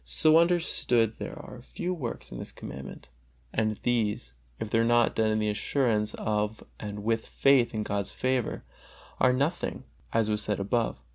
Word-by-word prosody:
So 155 0 +5
understood 160 -10 +2
there - - -6
are 125 - -9
very - - -12
few 175 +8 -4
works 130 -10 -5
in - - -6
this - - -7
Commandment; 65 +1 -9 0.4
and 110 -1 0
these, 105 - 0 0.3
if 110 - -4
they 115 - +3
are - - +4
not 120 0 +4
done 110 -1 +2
in 110 0 +1
assurance 105 0 0
of 105 0 -1 0.2
and 105 -1 -6
with 115 +1 0
faith 135 -3 +4
in 110 - -1
God's 100 -2 -2
favor, 130 -2 -1 0.6
are 130 - +5
nothing, 140 +7 -1 0.3
as 115 -1 +2
was 105 0 0
said 105 -1 -1
above. 110 +4 0
115 Hz, 170 wpm, -28 LUFS, 105-125 Hz, 0.6 s, So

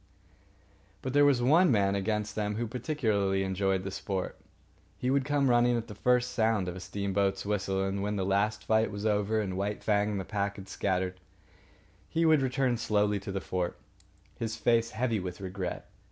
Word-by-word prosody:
But 130 - -3
there 145 0 +6
was 135 -4 +3
one 160 +8 +5
man 100 -3 +3
amongst 105 +1 -1
them 105 -1 -2
who 120 +2 -1
particularly 110 -7 0
enjoyed 95 0 0
the 95 - -4
sport. 95 -1 -3 0.6
He 125 - 0
would 135 -1 +2
come 145 -1 +2
running 120 0 +4
at 115 0 -4
the 105 - -8
first 125 +3 +2
sound 110 -5 +1
of 90 - -4
a - - -6
steamboat's 95 +2 -1
whistle; 95 -2 0
and 100 0 -2
when 105 +1 -1
the 95 -2 -1
last 100 +3 +1
fight 110 0 +3
was 100 +1 -5
over 105 +1 +1
and 95 -3 -2
White 100 +2 -2
Fang 105 -1 +2
and 105 -2 -2
the 95 - -4
pack 100 -1 -2
had 95 -1 -10
scattered, 95 -1 -1 0.9
he 165 +1 +1
would 155 -3 +5
return 130 -2 +1
slowly 105 -2 +1
to 100 - -6
the 95 - -2
fort, 90 -2 -2 0.6
his 115 -1 -2
face 115 -1 +2
heavy 115 -1 -1
with 90 -1 -6
regret. 95 -1 -5
105 Hz, 190 wpm, -29 LUFS, 95-120 Hz, 0.9 s, there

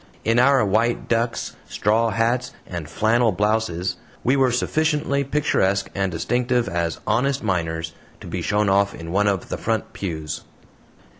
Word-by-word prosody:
In 115 +2 +3
our 135 -2 +5
white 115 +4 +1
ducks, 115 0 -1
straw 110 +3 +2
hats, 120 +2 0
and 85 -4 -6
flannel 110 +6 +2
blouses, 105 -3 0 0.3
we 130 - +3
were 135 -2 +3
sufficiently 150 +2 +1
picturesque 100 -9 +1
and 95 -1 -1
distinctive 120 +7 0
as 85 -1 -2
"honest 140 +3 +1
miners" 80 -3 -1 0.3
to - - -11
be - - -4
shown 105 0 +1
off 100 +1 +2
in 85 0 -7
one 100 +3 +2
of 100 -3 -1
the - - -3
front - - -2
pews. 80 -5 -4
110 Hz, 150 wpm, -22 LUFS, 95-125 Hz, 0.3 s, our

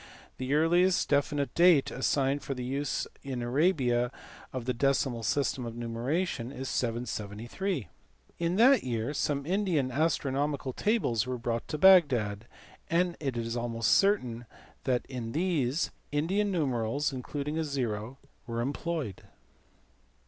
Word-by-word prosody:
The 130 +2 0
earliest 175 +4 +3
definite 145 0 +1
date 170 -5 +5
assigned 135 +1 +1
for 135 - -4
the 125 - -5
use 140 +3 -2 0.2
in 130 -3 -4
Arabia 125 -3 +2 0.4
of 130 -3 -5
the 125 - 0
decimal 130 -1 +1
system 130 +4 0
of 115 -1 -6
numeration 120 +3 -2
is 135 -1 -5
773. 120 - -3 0.5
In 170 +1 0
that 245 +4 +6
year 120 +2 -2
some 140 -1 -1
Indian 175 -7 0
astronomical 140 -2 0
tables 125 - +1
were 125 0 -2
brought 115 0 -3
to 150 - -3
Bagdad, 130 - +5 0.4
and 175 +1 +2
it 135 -5 -2
is 115 0 -2
almost 115 -1 0
certain 125 - +2 0.4
that 125 -2 +1
in 120 -4 -6
these 155 -4 0 0.2
Indian 190 +8 +1
numerals 140 - 0
(including 145 +4 -3
a - - +1
zero) 125 -4 -3 0.3
were 115 -1 -3
employed. 140 - -3
135 Hz, 130 wpm, -29 LUFS, 120-160 Hz, 0.5 s, that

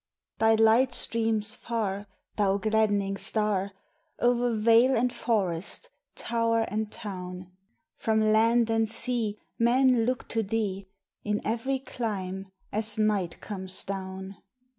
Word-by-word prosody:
Thy 225 0 +5
light 225 +3 +4
streams 225 -2 +2
far, 210 -4 -3 0.3
thou 200 -2 +2
gladdening 205 -2 +1
star, 200 -1 0 0.5
O'er 245 -1 +2
vale 230 +4 +4
and 245 +1 +1
forest, 200 - -1 0.2
tower 230 -1 0
and 215 +1 -3
town: 180 -3 -7 0.5
From 220 -1 +1
land 225 +2 +3
and 225 -1 +1
sea 230 -2 -1 0.2
men 245 0 +3
look 255 0 -2
to 225 - 0
thee, 200 -2 -2 0.4
In 210 0 -1
every 235 +5 -1
clime, 195 -7 -4 0.2
as 215 +1 -2
night 205 -5 0
comes 190 -3 -4
down. 190 0 -6
220 Hz, 120 wpm, -27 LUFS, 195-230 Hz, 0.5 s, Thy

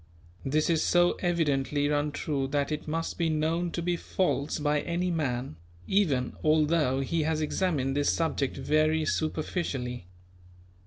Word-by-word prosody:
This 150 +3 +1
is 165 -2 +2
so 175 0 +4
evidently 145 -5 +1
untrue 145 -1 -1
that 140 +1 -1
it 150 0 -4
must 165 +3 -3
be 165 -1 +2
known 160 +3 0
to 170 - -2
be 175 0 +1
false 170 -4 -1
by 150 0 +1
any 175 +1 -1
man, 125 - -2 0.3
even 145 -11 +1
although 155 -3 +3
he 165 +4 0
has 155 0 0
examined 150 -4 0
this 145 0 +2
subject 160 -5 -1
very 155 +3 +2
superficially. 145 - -2
155 Hz, 140 wpm, -28 LUFS, 140-165 Hz, 0.3 s, so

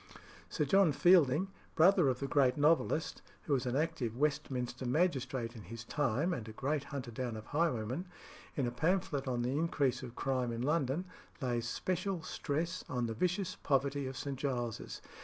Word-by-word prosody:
Sir - - 0
John 195 -5 +5
Fielding, 175 +2 +5 0.3
brother 175 0 +6
of 125 -1 -1
the 140 - -1
great 135 -2 +3
novelist, 155 +1 +2 0.2
who 145 - 0
was 130 -1 +1
an 125 - -1
active 140 -7 -1
Westminster 135 -4 -1
magistrate 130 -5 0
in 110 - -8
his 115 +4 -8
time 145 +5 0
and 115 -8 -5
a - - -8
great 140 +4 -1
hunter 135 -4 -5
down 120 -1 -3
of 110 - -8
highwaymen, 145 - -1 0.5
in 140 - +1
a 120 - -1
pamphlet 160 -1 0
on 120 -2 0
the 125 - 0
increase 145 -5 +1
of 125 -2 -8
crime 130 -2 0
in 115 +1 -3
London, 150 +3 +1 0.3
lays 120 -4 -1
special 185 +2 -2
stress 165 +4 -2
on 125 -2 -1
the 115 - -2
vicious 180 - -1
poverty 140 0 +1
of 130 0 -6
St. 135 -1 -4
Giles's. 120 -5 -3
140 Hz, 175 wpm, -34 LUFS, 125-160 Hz, 0.5 s, brother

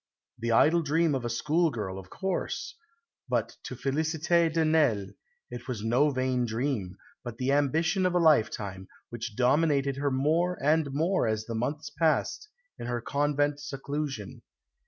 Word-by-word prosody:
The 115 +1 -1
idle 160 +9 +5
dream 160 +1 +2
of 130 -3 -2
a - - -1
schoolgirl, 120 - 0
of 95 -1 -12
course! 190 - -3 0.6
But - - -1
to - - -5
Félicité 160 +4 +1
de 160 0 +1
Nesle 140 -11 +2 0.4
it 120 0 -8
was 115 -5 -4
no 125 +7 +3
vain 130 -2 0
dream, 110 -5 -2 0.3
but 120 -2 -7
the 130 +2 0
ambition 160 +7 +2
of 180 - -2
a - - +4
lifetime, 110 - +2 0.2
which 115 -2 -5
dominated 140 +2 +2
her 140 0 0
more 160 +7 +1
and 150 0 +2
more 160 +1 +1
as 110 0 -1
the 115 - -5
months 140 +7 -3
passed 165 - 0 0.3
in - - -5
her 120 0 -1
convent 145 +3 0
seclusion. 140 -5 -5
140 Hz, 155 wpm, -28 LUFS, 120-160 Hz, 0.6 s, idle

